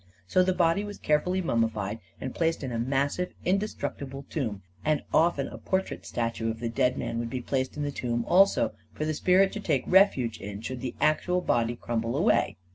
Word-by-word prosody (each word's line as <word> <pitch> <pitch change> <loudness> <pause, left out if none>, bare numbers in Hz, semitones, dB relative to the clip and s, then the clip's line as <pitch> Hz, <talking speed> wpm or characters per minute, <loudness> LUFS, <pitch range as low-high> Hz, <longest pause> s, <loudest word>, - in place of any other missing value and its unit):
So 185 - +3
the 185 +1 +3
body 175 +2 +2
was 205 -1 -7
carefully 180 +5 +1
mummified 110 - 0 0.2
and 130 - -5
placed 165 -2 0
in 130 - -3
a 115 - -2
massive, 140 +8 0
inde 195 +2 +3
structible 135 -6 -6
tomb; 110 -10 -3 0.2
and 155 -1 +1
often 160 -4 +3
a - - -9
portrait 190 0 -2
statue 115 -1 -2
of 110 0 -4
the 120 0 -2
dead 125 +1 +1
man 115 - -2
would 120 0 -3
be 130 - -3
placed 130 +2 -2
in 150 - -2
the 145 - -1
tomb 120 -3 -2
also, 195 +2 +4 0.2
for 155 - -3
the 155 - 0
spirit 185 +5 +4
to 215 - -4
take 150 -10 0
refuge 160 - +4
in, 100 +1 -6
should 125 +2 -5
the 130 - -4
actual 155 +4 +2
body 120 -8 +1
crumble 115 -1 -2
away. - - +2
135 Hz, 200 wpm, -28 LUFS, 115-175 Hz, 0.2 s, also